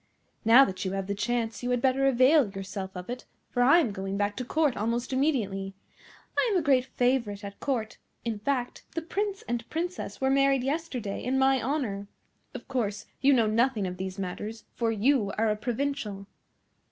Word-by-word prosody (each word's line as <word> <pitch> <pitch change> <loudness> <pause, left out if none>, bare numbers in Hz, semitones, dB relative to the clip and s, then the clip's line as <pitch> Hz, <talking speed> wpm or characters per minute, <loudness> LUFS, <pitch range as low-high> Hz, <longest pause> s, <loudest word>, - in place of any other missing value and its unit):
Now 240 +4 +8
that 185 -4 -4
you 190 -1 -2
have 195 -1 -2
the 200 - -2
chance 225 +1 -1
you 245 - -2
had 250 -1 +2
better 265 +2 +2
avail 265 0 +5
yourself 195 0 -5
of 180 +1 -7
it, 250 +1 -6 0.3
for 245 - 0
I 275 +7 +7
am 295 -11 +2
going 195 0 -4
back 205 0 0
to 250 - -2
Court 295 0 +1
almost 235 +4 -1
immediately. 200 -9 0 0.6
I - - +3
am 390 - +3
a 345 - +1
great 265 -4 +3
favourite 245 -6 0
at 200 0 -8
Court; 235 -6 -2 0.3
in 225 -3 -2
fact, 250 +2 -2
the 330 - -2
Prince 395 +3 -2
and 235 -1 -4
Princess 335 - -4
were 265 0 +2
married 275 -1 +3
yesterday 265 -8 -3
in 260 +2 0
my 265 -1 +4
honour. 225 -7 -2 0.5
Of - - -8
course 210 -6 -2 0.2
you 275 +2 +5
know 240 -5 +4
nothing 225 0 +2
of 180 0 -4
these 190 +1 -5
matters, 210 +4 -5
for 230 -1 0
you 220 -1 +2
are 220 0 +2
a - - +1
provincial." 230 -3 -3
240 Hz, 190 wpm, -28 LUFS, 205-270 Hz, 0.6 s, Now